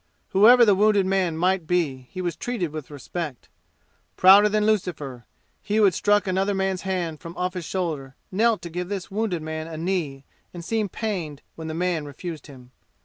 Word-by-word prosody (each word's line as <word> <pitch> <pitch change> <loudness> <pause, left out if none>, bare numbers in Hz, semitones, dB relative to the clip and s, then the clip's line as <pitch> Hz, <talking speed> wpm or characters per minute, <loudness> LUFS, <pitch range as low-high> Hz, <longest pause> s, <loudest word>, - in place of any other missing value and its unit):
Whoever 235 +5 +7
the 205 - +5
wounded 205 0 +3
man 185 -4 0
might 180 -1 +1
be 145 -8 -1
he 185 - -6
was 175 -3 -2
treated 190 -5 -3
with 155 -4 -7
respect. 145 0 -6 0.7
Prouder 200 +3 +7
than 210 0 +1
Lucifer, 160 - -2 0.3
he 210 0 -3
who 220 - +4
had 195 -3 +5
struck 205 +3 +2
another 195 +1 0
man's 190 -1 -1
hand 175 -5 -3
from 170 0 -10
off 180 0 -1
his 180 -3 -5
shoulder 150 -8 -3 0.2
knelt 220 +3 +2
to 170 - -7
give 180 +2 -4
this 195 -3 -5
wounded 200 -6 -2
man 160 0 -5
a 160 -1 -7
knee 160 -6 -2 0.3
and 170 -1 -7
seemed 215 -3 -1
pained 175 -10 -4
when 160 -1 -8
the 160 - -4
man 175 -3 -1
refused 155 +3 -7
him. 130 -3 -14
180 Hz, 190 wpm, -24 LUFS, 160-195 Hz, 0.7 s, Whoever